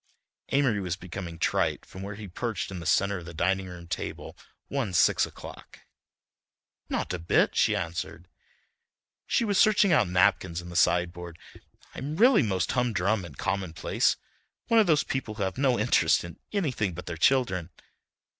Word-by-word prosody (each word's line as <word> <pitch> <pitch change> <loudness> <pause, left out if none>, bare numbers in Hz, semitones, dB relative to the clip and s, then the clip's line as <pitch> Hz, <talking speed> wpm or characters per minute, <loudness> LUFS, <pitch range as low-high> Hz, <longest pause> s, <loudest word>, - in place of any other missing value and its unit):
Amory 135 -7 +2
was 90 -3 -2
becoming 90 -2 -7
trite - - 0
from 95 - -11
where 100 +1 -6
he 105 0 -8
perched 100 +2 -4
in 95 - -5
the 85 - -6
centre 100 -1 +2
of 85 - -11
the 85 - -9
dining 95 +3 0
room 90 -1 -9
table 85 - -5 0.3
one 130 -9 -2
six - - +4
o'clock. - - -12 1.1
"Not - - -2
a 90 - -3
bit," 85 - +2
she - - +3
answered. 85 +1 -5 1.0
She 235 - +1
was 205 -3 +1
searching 205 -3 +5
out 105 - +3
napkins 90 -2 +2
in 90 0 -9
the 85 - -9
sideboard. 85 -1 +1 0.6
"I'm 145 +4 -5
really 240 +6 +5
most 95 - 0
humdrum 110 -5 0
and 75 -6 -11
commonplace. 95 -4 0 0.5
One 230 - +5
of 215 - +4
those 155 -4 +3
people 120 -5 -4
who 105 - -2
have 95 +5 -3
no 130 -3 +3
interest 105 -7 +3
in 85 -1 -10
anything 125 - -1
but 90 - -8
their 85 - -5
children." 95 -3 +2
95 Hz, 165 wpm, -27 LUFS, 85-125 Hz, 1.1 s, searching